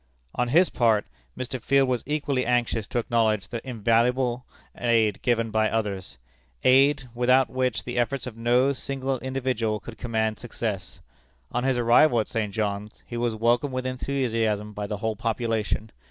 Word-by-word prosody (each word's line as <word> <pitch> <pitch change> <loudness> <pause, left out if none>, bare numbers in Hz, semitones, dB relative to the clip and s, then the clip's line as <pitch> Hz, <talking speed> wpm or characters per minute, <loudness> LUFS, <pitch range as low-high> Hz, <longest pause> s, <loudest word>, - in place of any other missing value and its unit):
On 125 - 0
his 170 +9 +4
part, 110 -4 +2 0.3
Mr. 130 0 -4
Field 135 +3 +3
was 125 -2 0
equally 145 -3 0
anxious 120 -3 0
to - - -3
acknowledge 110 -3 +1
the 115 -2 -4
invaluable 120 +1 +1 0.3
aid 115 -4 +1
given 115 -2 +1
by 110 0 +2
others 100 -9 -3 0.5
aid, 135 +1 +4
without 125 +2 +3
which 130 -4 -1
the 120 0 -3
efforts 125 +2 -1
of 125 -3 -7
no 120 +4 +3
single 135 -1 -3
individual 125 -5 -1
could 110 +1 -11
command 110 -2 -1
success. 105 -5 -5 0.5
On 125 - -1
his 135 -2 +2
arrival 120 +2 +5
at 110 - -1
St. 110 -3 -2
John's, 105 0 -3
he 120 - -8
was 120 -1 -1
welcomed 120 +5 +1
with 130 0 -2
enthusiasm 115 -5 -1
by 105 0 -4
the 105 - -3
whole 110 +1 -2
population. 110 -1 -2
120 Hz, 160 wpm, -25 LUFS, 110-130 Hz, 0.5 s, arrival